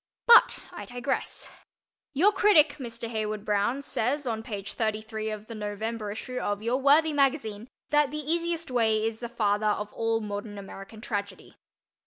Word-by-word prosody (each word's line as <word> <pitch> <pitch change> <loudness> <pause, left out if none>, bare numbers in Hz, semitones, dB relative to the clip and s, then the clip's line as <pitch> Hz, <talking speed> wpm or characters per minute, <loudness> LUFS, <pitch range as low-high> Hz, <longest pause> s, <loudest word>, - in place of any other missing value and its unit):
But 470 0 +7
I - - -8
digress. 245 +2 -3 0.6
Your 375 +9 +5
critic, 330 -8 +5
Mr. 235 -2 -6
Heywood 215 -2 -3
Broun, 210 +7 0
says 280 +3 -1
on 225 -3 -2
page 205 -4 -6
33 220 0 -2
of 215 -1 -6
the 230 - -8
November 215 +1 -4
issue 250 +4 -5
of 205 +1 -2
your 235 +3 +1
worthy 300 +3 +5
magazine 265 -6 0 0.2
that 295 -1 +4
The 300 - -5
Easiest 335 +1 -2
Way 220 -3 +2
is 225 0 -2
the 235 - -5
father 215 -2 +1
of 210 0 -1
all 225 0 0
modern 205 -1 -5
American 195 +2 -10
tragedy. 200 -4 -5
225 Hz, 160 wpm, -27 LUFS, 210-275 Hz, 0.6 s, But